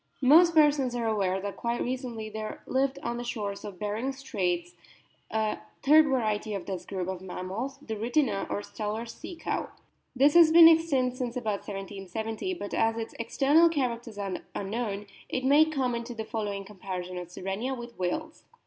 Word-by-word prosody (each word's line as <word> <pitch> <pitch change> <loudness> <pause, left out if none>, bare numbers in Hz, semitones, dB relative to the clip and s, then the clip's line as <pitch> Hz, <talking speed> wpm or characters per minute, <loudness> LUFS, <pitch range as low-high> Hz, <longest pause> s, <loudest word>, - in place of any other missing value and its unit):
Most 330 +6 +7
persons 290 -5 +4
are 235 -1 -1
aware 195 -4 +1
that 200 +1 -5
quite 235 0 -1
recently 245 -3 -3
there 215 0 -6
lived 270 +1 0
on 235 0 -2
the 240 - -4
shores 205 -4 -4
of 200 -3 -7
Behring's 220 +7 -3
Straits 180 -9 -2 0.6
a 220 -1 -1 0.2
third 305 +3 +7
variety 215 -5 0
of 195 - -5
this 190 -3 -5
group 185 -3 -3
of 190 -1 -4
mammals, 190 +8 -5
the 220 -5 -4
Rhytina, 230 -1 0
or 205 - -2
Steller's 215 +2 -4
Sea 340 +3 -9
cow. 330 - -3 0.5
This 280 +3 +5
has 335 -2 +8
been 330 0 +10
extinct 280 -7 +3
since 250 -1 -3
about 215 -5 -3
1770. 205 - -4
But, 205 -12 -6
as 225 0 +2
its 225 -1 -5
external 285 +8 +4
characters 240 -7 -2
are 195 -1 -5
known, 210 0 -3 0.2
it 255 - -2
may 290 +3 +6
come 270 -6 -1
into 235 +1 -4
the 220 -1 -4
following 205 -4 -3
comparison 185 -2 -6
of 175 -1 -8
Sirenia 195 +9 -3
with 240 -2 -10
whales. 310 - -3
230 Hz, 175 wpm, -28 LUFS, 200-265 Hz, 0.6 s, been